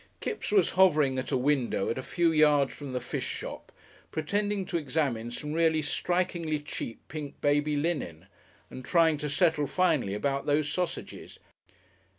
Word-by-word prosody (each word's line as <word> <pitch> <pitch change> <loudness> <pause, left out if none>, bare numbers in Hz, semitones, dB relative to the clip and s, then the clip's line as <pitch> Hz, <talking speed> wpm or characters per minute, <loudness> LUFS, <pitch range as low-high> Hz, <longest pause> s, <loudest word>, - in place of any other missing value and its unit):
Kipps 430 - -4
was 405 -2 +4
hovering 150 -8 +4
at 130 - -4
a - - +1
window 130 -6 +1
at 115 - -3
a - - -2
few 170 +5 +1
yards 150 -3 +4
from 145 -2 -8
the 125 - -1
fish 125 - -4
shop, - - -6 0.4
pretending 200 +5 -1
to 170 - -2
examine 135 -6 -1
some 150 +5 -5
really 160 -1 +2
strikingly 170 0 -1
cheap 145 -5 -7
pink 150 -2 -7
baby 145 +1 +2
linen, 145 - -2 0.5
and 130 - -8
trying 160 +1 +3
to 150 0 -3
settle 155 -1 +2
finally 155 - +1
about 140 +6 -1
those 145 0 +2
sausages. 180 -1 -4
150 Hz, 160 wpm, -28 LUFS, 135-165 Hz, 0.5 s, was